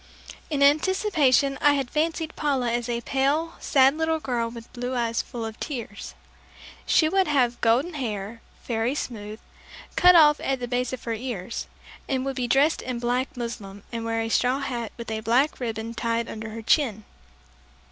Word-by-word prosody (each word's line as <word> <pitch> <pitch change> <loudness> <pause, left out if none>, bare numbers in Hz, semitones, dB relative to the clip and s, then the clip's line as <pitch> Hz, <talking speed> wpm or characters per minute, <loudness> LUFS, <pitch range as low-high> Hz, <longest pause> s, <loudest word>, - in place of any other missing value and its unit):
In 285 -3 +1
anticipation 295 -3 +3
I 290 - +5
had 270 -3 -2
fancied 320 +1 -1
Paula 270 -5 0
as 240 0 -2
a 235 0 -1
pale, 285 +6 0
sad 270 0 +4
little 320 0 +1
girl 240 -5 -1
with 230 0 -11
blue 245 +1 -3
eyes 235 -1 0
full 235 -3 -6
of 220 -1 -7
tears. 235 -8 -6 0.7
She 315 - +4
would 380 +3 +2
have 250 -5 +1
golden 255 +10 +2
hair, 225 -5 -4 0.2
very 235 +3 0
smooth, 215 -5 -5 0.6
cut 360 0 +7
off 300 -3 +7
at 270 -1 -1
the 245 - -4
base 250 0 -1
of 255 - -6
her 230 - -2
ears, 225 -4 -5 0.4
and 265 -1 0
would 270 -1 -2
be 250 -1 -1
dressed 275 +5 +3
in 250 -1 -4
black 245 +2 -1
muslin, 205 -5 -6
and 230 -1 -4
wear 225 0 -1
a 225 - -2
straw 250 +3 +2
hat 245 -5 -4
with 235 -1 -6
a 220 - -2
black 245 +7 +2
ribbon 225 -2 -4
tied 230 0 -1
under 220 0 -6
her 225 +1 -7
chin. 220 -5 +2
245 Hz, 180 wpm, -25 LUFS, 230-280 Hz, 0.7 s, cut